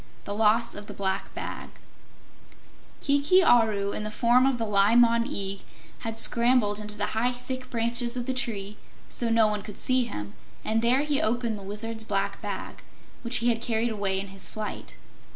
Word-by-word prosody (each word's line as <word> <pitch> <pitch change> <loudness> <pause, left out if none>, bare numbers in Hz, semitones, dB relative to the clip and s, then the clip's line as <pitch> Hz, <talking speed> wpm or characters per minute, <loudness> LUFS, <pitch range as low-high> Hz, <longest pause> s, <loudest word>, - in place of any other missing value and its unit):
The 205 - -5
Loss 220 +2 +2
of 205 0 -9
the - - -9
Black 190 -1 -2
Bag - - -6 1.3
Kiki 285 +6 +4
Aru, 215 -8 +3
in 210 - -3
the 215 - -3
form 240 +4 +3
of 270 -2 +1
the 230 - -2
Li 205 +1 +3
Mon 235 -1 +5
Eag, 195 -2 -4 0.4
had 225 -2 -5
scrambled 235 -3 +2
into 210 0 -6
the 205 - -2
high, 235 +3 +1
thick 255 +1 -6
branches 235 +1 0
of 245 - -3
the 260 - -1
tree, 210 -5 -2 0.3
so 235 - +1
no 225 -1 +4
one 210 -1 -1
could 210 -1 -10
see 255 -1 +1
him, 105 - -6 0.3
and 220 +1 +1
there 245 +4 +3
he 295 -1 0
opened 235 0 0
the - - -11
Wizard's 220 +3 -2
black 200 -2 -2
bag, - - -6 0.4
which 235 +1 +3
he - - +5
had 230 -1 0
carried 230 0 0
away 200 -3 -1
in 195 0 -5
his 195 0 -5
flight. 215 -1 -6
225 Hz, 190 wpm, -27 LUFS, 205-245 Hz, 1.3 s, Mon